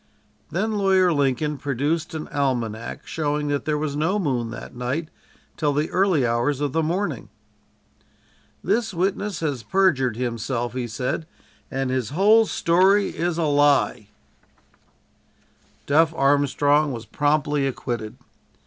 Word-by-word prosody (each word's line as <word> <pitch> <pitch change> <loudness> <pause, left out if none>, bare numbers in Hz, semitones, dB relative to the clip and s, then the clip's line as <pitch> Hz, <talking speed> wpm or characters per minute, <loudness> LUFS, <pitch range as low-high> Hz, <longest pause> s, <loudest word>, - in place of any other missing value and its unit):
Then 210 +4 -1
Lawyer 190 -3 +3
Lincoln 145 +1 0
produced 145 +4 -2
an 155 - -5
almanac 120 -6 -2
showing 150 -1 -2
that 145 -1 -1
there 150 -1 0
was 150 -1 -2
no 165 +7 +1
moon 130 - -1
that 120 - -9
night 130 +7 -3 0.5
till 150 -3 +1
the 150 +2 -1
early 180 -7 +2
hours 120 +4 0
of 145 -2 -1
the 160 - +2
morning. 180 +6 -2 1.3
"This 225 -5 0
witness 195 +1 -1
has 145 -6 -2
perjured 135 - +1
himself," 120 0 -2
he 125 -2 -3
said, 125 +7 -3 0.4
"and 135 -1 -2
his 130 -4 -1
whole 210 +8 +4
story 190 +5 +3
is 170 +1 -2
a 170 - 0
lie." 145 -7 +2 1.8
"Duff" 160 +3 +3
Armstrong 145 +1 +2
was 115 -3 -6
promptly 145 +3 +1
acquitted. 120 -4 -4
145 Hz, 130 wpm, -23 LUFS, 130-170 Hz, 1.8 s, whole